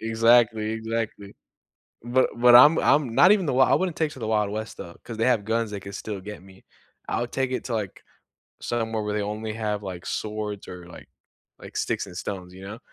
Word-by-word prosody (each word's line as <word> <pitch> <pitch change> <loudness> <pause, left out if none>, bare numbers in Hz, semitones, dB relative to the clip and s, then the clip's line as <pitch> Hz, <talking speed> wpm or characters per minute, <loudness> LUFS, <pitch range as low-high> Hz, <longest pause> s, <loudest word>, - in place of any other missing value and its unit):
Exactly 115 -1 +3
exactly, 110 -2 -4 0.7
but 120 +2 +2
but 120 0 +6
I'm 145 +6 +8
I'm 135 -6 +2
not 185 - +7
even 200 -4 +1
the 140 - 0
wild, 130 - +4
I - - +5
wouldn't 185 -3 -1
take 160 -2 0
it - - -11
to - - -12
the 115 - -4
wild 105 -2 +1
west 110 +1 -5
though, 85 - -9
cause 115 - -7
they 115 - 0
have 120 -5 +2
guns 115 0 -1
they 100 - -5
can 100 +1 -9
still 105 -3 -6
get 105 -1 -9
me. 95 0 -18 0.4
I'll 120 - -1
take 130 +1 -2
it 125 - -3
to, 125 - -5
like, 105 -5 -4 0.6
somewhere 110 -2 -2
where 105 0 -3
they 105 - -1
only 110 +1 -4
have, 105 -2 -3
like, 95 -3 -7
swords 105 -1 -4
or, 90 -1 -9
like 90 - -13 0.5
like, - - -11
sticks, - - -1
and 90 - -11
stones, 90 -2 -6
you 95 +1 -12
know? 110 +3 -8
110 Hz, 225 wpm, -25 LUFS, 105-120 Hz, 0.7 s, I'm